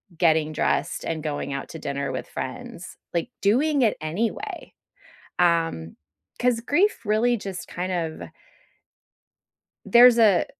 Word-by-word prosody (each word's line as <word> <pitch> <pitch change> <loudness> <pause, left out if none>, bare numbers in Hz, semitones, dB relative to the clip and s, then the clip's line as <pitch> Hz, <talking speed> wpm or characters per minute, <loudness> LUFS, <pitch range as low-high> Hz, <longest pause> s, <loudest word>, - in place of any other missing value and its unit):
getting 160 -2 +2
dressed - - -1
and 160 -2 -3
going 145 -2 -3
out 140 - -5
to 160 - -8
dinner 140 -2 -3
with 130 - -5
friends, 130 +6 -7 0.2
like, 170 +7 -1
doing 275 +8 +2
it 220 - +2
anyway, 230 - -4 0.7
um, 165 - +1 0.4
'cause 245 -2 +2
grief 295 - +1
really 230 +3 +2
just 195 -3 -7
kind 180 +2 -4
of 165 -3 -4 1.6
there's 240 0 +7
a 210 -6 +5
180 Hz, 125 wpm, -24 LUFS, 155-235 Hz, 1.6 s, there's